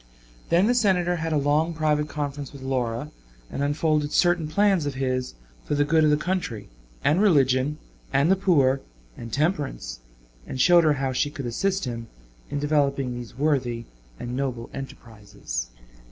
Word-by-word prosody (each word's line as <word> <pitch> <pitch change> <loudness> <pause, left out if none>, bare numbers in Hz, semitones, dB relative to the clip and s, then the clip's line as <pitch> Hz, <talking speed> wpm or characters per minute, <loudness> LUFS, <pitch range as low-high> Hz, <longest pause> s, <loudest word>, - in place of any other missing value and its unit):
Then 175 +3 +4
the 240 - +3
Senator 180 -7 +2
had 160 0 -3
a 155 - +2
long 150 +4 +1
private 150 -1 +1
conference 145 -2 -4
with 140 -2 -11
Laura, 130 +1 -2 0.4
and - - -3
unfolded 150 +1 +1
certain 175 -2 +3
plans 190 -1 +2
of 140 - -3
his 130 - -2 0.3
for - - -2
the 145 0 +2
good 160 +1 +3
of 155 - +5
the 150 - +4
country, 155 - -3 0.3
and 155 +7 +3
religion, 140 -6 +3 0.3
and 145 +6 +3
the - - +6
poor, 145 -9 +3 0.3
and 115 - -8
temperance, 135 - -1 0.5
and 130 - -5
showed 170 +5 +6
her 155 - +5
how 135 -2 -2
she 145 - +1
could 140 -2 -7
assist 190 +11 -1
him 115 -2 -5 0.4
in - - -3
developing 140 -3 +1
these 120 -1 -8
worthy 130 -5 0 0.3
and 120 +1 -5
noble 125 -3 -3
enterprises. 105 - -7
145 Hz, 165 wpm, -25 LUFS, 130-160 Hz, 0.5 s, the